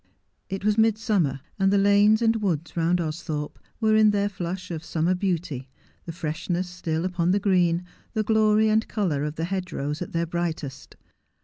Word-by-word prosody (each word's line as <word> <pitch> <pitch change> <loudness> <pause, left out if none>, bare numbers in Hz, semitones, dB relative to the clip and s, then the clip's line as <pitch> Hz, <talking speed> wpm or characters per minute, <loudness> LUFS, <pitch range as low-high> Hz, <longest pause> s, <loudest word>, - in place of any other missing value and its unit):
It 195 +1 -4
was 210 +1 +2
midsummer, 210 - +2 0.2
and 195 0 +3
the 200 - +4
lanes 205 +3 +4
and 225 0 +3
woods 170 -5 -2
round 170 +1 +2
Austhorpe 155 -2 -4 0.2
were 220 -1 +3
in 215 0 +6
their 205 0 +1
flush 185 -1 -5
of 160 -1 -5
summer 165 +2 0
beauty, 170 -8 -2 0.4
the 170 - -5
freshness 170 +3 -3
still 170 -2 -3
upon 175 -2 0
the 195 +3 +3
green, 180 -3 +2 0.3
the 220 -2 0
glory 215 0 +3
and 220 +1 +2
colour 175 -10 -1
of 150 0 -3
the 165 - -2
hedgerows 175 -5 -3
at 180 - -5
their 165 0 0
bright 170 -1 -2
est. 135 -2 -9
180 Hz, 180 wpm, -25 LUFS, 165-205 Hz, 0.4 s, in